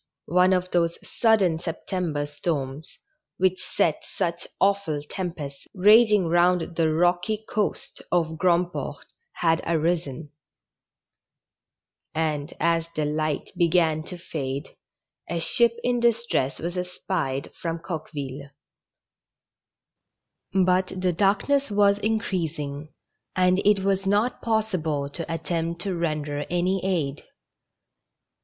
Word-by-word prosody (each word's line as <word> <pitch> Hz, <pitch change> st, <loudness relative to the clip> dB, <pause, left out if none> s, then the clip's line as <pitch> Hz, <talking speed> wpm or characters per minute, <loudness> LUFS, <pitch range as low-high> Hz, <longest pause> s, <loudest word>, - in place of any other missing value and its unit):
One 180 Hz, +1 st, +5 dB
of 185 Hz, 0 st, +1 dB
those 170 Hz, -1 st, +1 dB
sud 220 Hz, -2 st, +3 dB
den 170 Hz, -4 st, +2 dB
September 165 Hz, -3 st, -2 dB
storms, 145 Hz, 0 st, -4 dB, 0.4 s
which 185 Hz, 0 st, +1 dB
set 160 Hz, -, 0 dB
such 170 Hz, -2 st, -3 dB
awful 195 Hz, -7 st, +1 dB
tem 180 Hz, +1 st, -3 dB
pests 140 Hz, -4 st, -8 dB
raging 210 Hz, 0 st, +6 dB
round 175 Hz, 0 st, +2 dB
the 160 Hz, -1 st, +2 dB
rocky 175 Hz, +6 st, +1 dB
coast 215 Hz, -4 st, -2 dB
of 160 Hz, -3 st, +1 dB
Grandport, 175 Hz, -1 st, 0 dB, 0.3 s
had 165 Hz, -1 st, +1 dB
arisen; 160 Hz, -3 st, -1 dB, 1.8 s
and, 155 Hz, -1 st, -1 dB
as 165 Hz, 0 st, +1 dB
the 155 Hz, -, 0 dB
light 150 Hz, 0 st, -1 dB
began 170 Hz, -3 st, +3 dB
to 180 Hz, -, -6 dB
fade, 140 Hz, -5 st, -4 dB, 0.6 s
a 170 Hz, -, -1 dB
ship 235 Hz, +7 st, +3 dB
in 245 Hz, -1 st, +1 dB
distress 235 Hz, -, +1 dB
was 175 Hz, +2 st, -3 dB
espied 180 Hz, -6 st, -3 dB
from 165 Hz, -1 st, -4 dB
Coqueville. 145 Hz, -5 st, -6 dB, 2.0 s
But 185 Hz, 0 st, +2 dB
the 185 Hz, -1 st, +1 dB
darkness 210 Hz, -, +2 dB
was 200 Hz, -1 st, +3 dB
increasing, 160 Hz, -9 st, -2 dB, 0.4 s
and 185 Hz, 0 st, +3 dB
it 205 Hz, -1 st, +4 dB
was 195 Hz, 0 st, +1 dB
not 210 Hz, +5 st, +1 dB
possible 180 Hz, -11 st, 0 dB
to 165 Hz, +2 st, -5 dB
attempt 165 Hz, 0 st, -2 dB
to 190 Hz, -1 st, -2 dB
render 150 Hz, -3 st, -2 dB
any 180 Hz, +2 st, 0 dB
aid. 160 Hz, -7 st, -1 dB
175 Hz, 110 wpm, -25 LUFS, 155-190 Hz, 2.0 s, raging